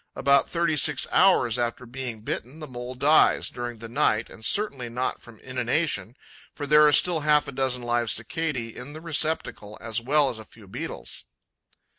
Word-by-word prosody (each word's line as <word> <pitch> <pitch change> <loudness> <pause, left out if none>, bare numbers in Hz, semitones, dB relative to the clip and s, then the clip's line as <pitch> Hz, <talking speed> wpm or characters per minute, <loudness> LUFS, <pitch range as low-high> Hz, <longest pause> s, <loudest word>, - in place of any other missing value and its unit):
About 140 0 +3
thirty 170 -2 0
six 150 -2 +2
hours 125 - +4
after 120 +1 -2
being 120 -2 -6
bitten, 125 +5 -5
the 155 - -8
Mole 125 -2 -8
dies 145 +5 +3
during 120 -1 -6
the 115 +1 -8
night 115 -3 0
and 110 - -13
certainly 135 - 0
not 125 +2 -2
from 115 -3 -15
inanition, 125 - -2 0.4
for 145 - -6
there 150 +1 +6
are - - +4
still 165 +3 +4
half 150 -1 +2
a - - -5
dozen 130 -2 -1
live 120 -1 0
Cicadae 120 0 -2
in 140 +4 -8
the 155 - -9
receptacle, 155 -9 -2
as 115 0 -3
well 145 +4 +3
as 120 -4 -4
a - - -9
few 110 -1 -16
Beetles. 130 +12 -7
130 Hz, 180 wpm, -25 LUFS, 120-150 Hz, 0.4 s, there